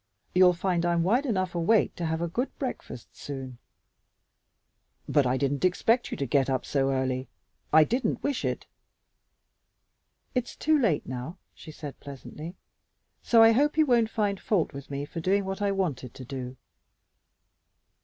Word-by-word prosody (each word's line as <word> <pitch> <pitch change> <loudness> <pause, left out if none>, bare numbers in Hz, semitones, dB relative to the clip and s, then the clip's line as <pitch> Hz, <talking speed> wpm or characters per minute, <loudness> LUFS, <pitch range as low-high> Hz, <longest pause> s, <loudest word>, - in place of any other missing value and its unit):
You'll 180 0 +6
find 175 -1 0
I'm 170 -1 +2
wide 245 +10 +2
enough 185 -6 0
awake 180 +6 +2
to 170 - -2
have 160 +1 -1
a - - 0
good 245 +11 -2
breakfast 250 - -6
soon." 130 -3 -7 1.5
"But 145 -4 +3
I 125 +1 +1
didn't 140 0 -1
expect 225 +7 +2
you - - -4
to 140 - -1
get 135 +1 +2
up 130 -1 -1
so 135 -1 +1
early. 130 -1 -1 0.4
I 155 0 +7
didn't 245 - -1
wish 285 -2 -1
it." - - -2 1.7
"It's 250 -1 -2
too 310 -1 +2
late 195 - +1
now," 130 +8 -6 0.2
she 155 - -11
said 150 -2 -9
pleasantly, 150 +5 -9 0.7
"so 230 -1 +5
I 225 - +8
hope 290 +6 +2
you 310 - +5
won't 235 -4 +3
find 205 -3 -1
fault 175 -7 0
with 140 0 -9
me 140 0 -3
for 165 - -7
doing 195 +4 +1
what 195 +2 -4
I 200 -1 +2
wanted 160 -11 -2
to 130 - -9
do." 130 -1 -6
170 Hz, 165 wpm, -27 LUFS, 140-215 Hz, 1.7 s, I